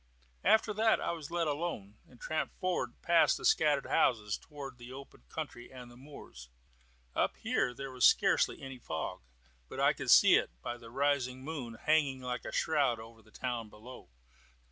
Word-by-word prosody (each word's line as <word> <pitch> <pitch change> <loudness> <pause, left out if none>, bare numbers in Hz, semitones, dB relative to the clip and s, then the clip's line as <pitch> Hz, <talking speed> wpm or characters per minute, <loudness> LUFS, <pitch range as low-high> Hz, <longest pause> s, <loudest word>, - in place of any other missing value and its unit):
After 220 -1 +4
that 220 +1 +3
I - - -1
was 160 -4 -6
let 170 -1 0
alone, 145 - -4
and 125 - -19
tramped 155 0 -3
forward 175 -10 -1
past 170 -1 +4
the - - -7
scattered 150 -3 +3
houses, 105 -4 +2
towards 140 -5 -10
the 120 +1 -10
open 135 - -11
country 120 0 -7
and 125 -2 -11
the - - -15
moors. 125 - -12 0.6
Up - - 0
here 125 - 0
there 135 +2 -7
was 125 -1 -3
scarcely - - +4
any 135 -1 -8
fog, 80 -8 -5 0.5
but - - -7
I - - +4
could - - -6
see - - +8
it, - - -1
by 120 - -4
the 115 -1 -13
rising 130 -1 0
moon, 135 -7 -6
hanging 140 +1 +1
like 125 -1 -5
a - - -5
shroud 140 -7 +1
over 115 0 -12
the 110 - -22
town 120 -1 -4
below. 115 - -13
130 Hz, 180 wpm, -32 LUFS, 120-150 Hz, 0.6 s, see